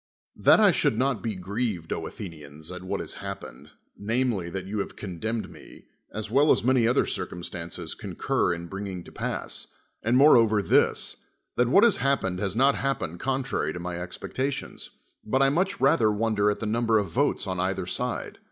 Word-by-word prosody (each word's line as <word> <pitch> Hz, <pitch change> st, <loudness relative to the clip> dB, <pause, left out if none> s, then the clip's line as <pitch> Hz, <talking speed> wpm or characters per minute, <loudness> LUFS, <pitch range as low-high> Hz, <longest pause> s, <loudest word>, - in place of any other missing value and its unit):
That -, -, +6 dB
I -, -, +7 dB
should 110 Hz, -, +1 dB
not 130 Hz, -4 st, +1 dB
be 110 Hz, -3 st, -3 dB
grieved, 95 Hz, -2 st, -3 dB
Athenians, 80 Hz, -3 st, -7 dB
at 90 Hz, -1 st, -7 dB
what 95 Hz, -, -3 dB
has -, -, -4 dB
ha])pened, -, -, -8 dB, 0.3 s
namely, 110 Hz, -4 st, -1 dB
that 95 Hz, +1 st, -5 dB
you 105 Hz, +2 st, -3 dB
have -, -, -4 dB
con 90 Hz, -5 st, -7 dB
demned 110 Hz, +2 st, -3 dB
me, -, -, -14 dB, 0.3 s
as 110 Hz, 0 st, -5 dB
well 140 Hz, +5 st, +4 dB
as -, -, +4 dB
many 125 Hz, -2 st, +3 dB
other 120 Hz, -, +3 dB
circumstance.5 85 Hz, -1 st, -5 dB
concur -, -, 0 dB
in 85 Hz, 0 st, -4 dB
bringing 95 Hz, 0 st, -6 dB
to -, -, -13 dB
pass, -, -, -3 dB, 0.3 s
and 120 Hz, +3 st, +2 dB
moreover 115 Hz, -7 st, +6 dB
this, -, -, +2 dB, 0.4 s
that 125 Hz, 0 st, +2 dB
what 195 Hz, -, +6 dB
has 235 Hz, -5 st, +5 dB
happened 125 Hz, -9 st, 0 dB
has 100 Hz, 0 st, -1 dB
not 135 Hz, +4 st, +5 dB
hapi)ened 90 Hz, -12 st, -2 dB
con 135 Hz, 0 st, -1 dB
tfai 130 Hz, -, -2 dB
y -, -, 0 dB
to 90 Hz, -, -6 dB
my 90 Hz, 0 st, -4 dB
expectations; 130 Hz, +10 st, -4 dB, 0.3 s
but 130 Hz, +5 st, +2 dB
I 135 Hz, -, +5 dB
nmch 185 Hz, +7 st, 0 dB
rather 115 Hz, -5 st, +4 dB
wonder 105 Hz, -1 st, +1 dB
at 105 Hz, -, -1 dB
the -, -, -2 dB
number 115 Hz, +1 st, +2 dB
of 100 Hz, -5 st, -1 dB
votes 140 Hz, -4 st, +1 dB
on 95 Hz, -2 st, -3 dB
either 95 Hz, 0 st, -1 dB
side. -, -, -3 dB
105 Hz, 190 wpm, -26 LUFS, 90-125 Hz, 0.4 s, I